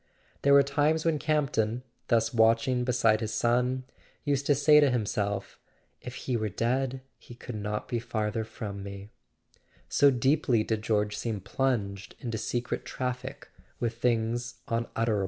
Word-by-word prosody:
There 140 - +4
were 140 0 +8
times 150 +3 +1
when 160 -3 +2
Campton, 130 -7 0 0.2
thus 115 0 +2
watching 115 +2 +3
beside 115 -3 +2
his 110 -1 -2
son, 125 +2 +1 0.4
used 140 -1 0
to 145 - +5
say 150 +2 +6
to 145 -2 +5
himself: 105 -4 -2 0.4
"If 125 0 -7
he 130 - -1
w 110 -2 0
T 115 - -2
ere 125 +2 +3
dead 130 +1 -8 0.2
he 120 - -13
could 120 +1 -8
not 105 0 -3
be 120 - -1
farther 110 -1 -2
from 105 -2 -6
me"—so 100 +7 -3
deeply 130 -2 +2
did 110 -1 -1
George 105 -1 0
seem 110 -2 -3
plunged 100 -2 -2
in 115 -2 -4
secret 120 +2 -2
traffic 125 -1 -5 0.3
with 115 -1 -2
things 120 0 0
unutterable. 115 -2 0
120 Hz, 155 wpm, -28 LUFS, 110-130 Hz, 0.4 s, were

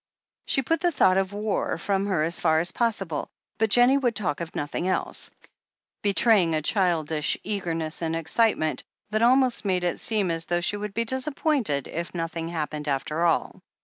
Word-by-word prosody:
She 270 - +2
put 330 +6 0
the 350 0 +2
thought 190 - +3
of 195 0 0
war 210 0 -2
from 200 0 -1
her 185 -6 +1
as 165 +1 0
far 160 -2 +3
as 175 +3 +2
pos 230 0 +1
sible, 165 -7 -4 0.3
but 220 0 +2
Jennie 245 +5 +5
would 245 -4 0
talk 175 -7 -1
of 165 -1 -6
nothing 145 +4 -3
else, 185 - -2 0.7
betraying 200 -4 +3
a 155 - 0
childish 160 -6 +1
eagerness 165 -6 -3
and 165 -1 -1
excitement 165 0 +1 0.3
that 215 +1 0
almost 255 +1 +4
made 185 -3 0
it 175 - -1
seem 205 -6 0
as 165 0 -3
though 175 0 0
she 175 - -1
would 210 -1 -6
be 230 +1 0
disappointed 260 - -1
if 170 +2 -5
nothing 165 -1 -3
happened 150 -2 -4
after 150 +4 -1
all. 165 - 0
185 Hz, 180 wpm, -25 LUFS, 165-220 Hz, 0.7 s, Jennie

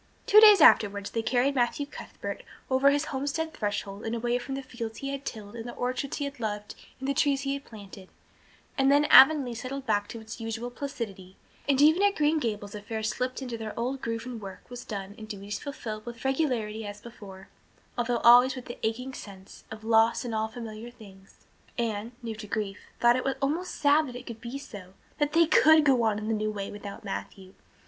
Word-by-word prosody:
Two 425 - +8
days 420 -4 +8
afterwards 200 -8 +5
they 230 - -1
carried 255 +4 +1
Matthew 255 +2 0
Cuthbert 290 - -7 0.3
over 265 +2 +5
his 290 +2 +1
homestead 290 +4 -2
threshold 205 -1 -4
and 225 +1 -2
away 240 +1 0
from 270 +2 -5
the 275 - -5
fields 235 -3 -6
he 275 - -5
had 275 0 -5
tilled 210 -1 -7
and 230 -1 -7
the - - -8
orchards 255 +2 -2
he 285 - -2
had 280 -2 -7
loved 210 -2 -4 0.3
and 265 - -4
the 280 - +1
trees 275 0 +2
he 275 0 -1
had 280 0 -6
planted; 200 -3 -12 0.7
and 270 0 +4
then 290 +1 +5
Avonlea 270 -3 +8
settled 260 +3 -6
back 205 -3 +1
to 230 - -8
its 220 +1 -9
usual 225 +2 -4
placidity 210 -9 -6 0.3
and 270 -1 +3
even 315 +5 +6
at 405 0 +3
Green 305 +1 +2
Gables 210 -6 -3
affairs 220 +1 -4
slipped 255 +3 -3
into 240 -3 -5
their 220 -1 -6
old 260 +3 -2
groove 230 0 -3
and 245 -3 -6
work 195 -2 -10
was 245 - -7
done 200 -2 -6
and 215 - -9
duties 205 -1 -6
fulfilled 220 -7 -6
with 235 +1 -8
regularity 250 -6 0
as 205 0 -7
before, 200 -5 -12 0.5
although 240 0 0
always 245 +2 +7
with 255 - -8
the 240 - -8
aching 250 +4 -2
sense 195 -5 -11
of 220 -1 -9
"loss 225 +2 +3
in 235 - -4
all 220 0 0
familiar 220 0 -8
things." 195 -5 -17 0.3
Anne, 225 -1 -2
new 230 -1 -4
to 215 -1 -8
grief, 205 -1 -3 0.2
thought 240 0 +5
it 265 +1 -1
almost 320 +7 -2
sad 295 +1 +3
that 250 - -8
it 250 +1 -8
could 230 -1 -8
be 245 +3 -5
so 195 -9 -11 0.2
that 295 0 +1
they 335 0 +6
could 315 -2 +6
go 265 -4 +4
on 220 -2 +1
in 210 - -5
the 215 - -1
old 215 - -3
way 200 -1 -4
without 205 -1 -8
Matthew. 185 - -7
235 Hz, 210 wpm, -28 LUFS, 215-270 Hz, 0.7 s, Two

